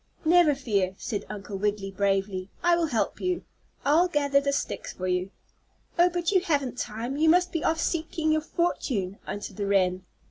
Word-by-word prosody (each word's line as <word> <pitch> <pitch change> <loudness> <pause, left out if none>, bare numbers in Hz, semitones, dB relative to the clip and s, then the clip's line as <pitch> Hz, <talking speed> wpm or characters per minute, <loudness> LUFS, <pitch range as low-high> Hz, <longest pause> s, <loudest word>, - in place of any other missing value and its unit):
"Never 330 -3 +5
fear!" 200 -8 0
said 205 -4 -4
Uncle 200 -1 -6
Wiggily, 205 -1 -1
bravely. 195 -1 0
"I 345 0 +5
will 340 -1 +1
help 235 -7 -1
you. 365 -1 -1 0.4
I'll 315 +6 +5
gather 285 -4 +2
the 280 0 0
sticks 280 - -3
for 185 - -5
you." 180 +1 0 0.7
"Oh, 350 +1 +6
but 350 0 -1
you 375 -3 +4
haven't 280 -8 -1
time; 235 +5 -3
you 320 +1 +4
must 360 +2 +4
be 330 - -2
off 325 0 +1
seeking 320 -1 0
your 310 0 +2
fortune," 245 - -1
answered 205 - -6
the 200 -1 -2
wren. 185 -2 +2
275 Hz, 180 wpm, -27 LUFS, 200-330 Hz, 0.7 s, Oh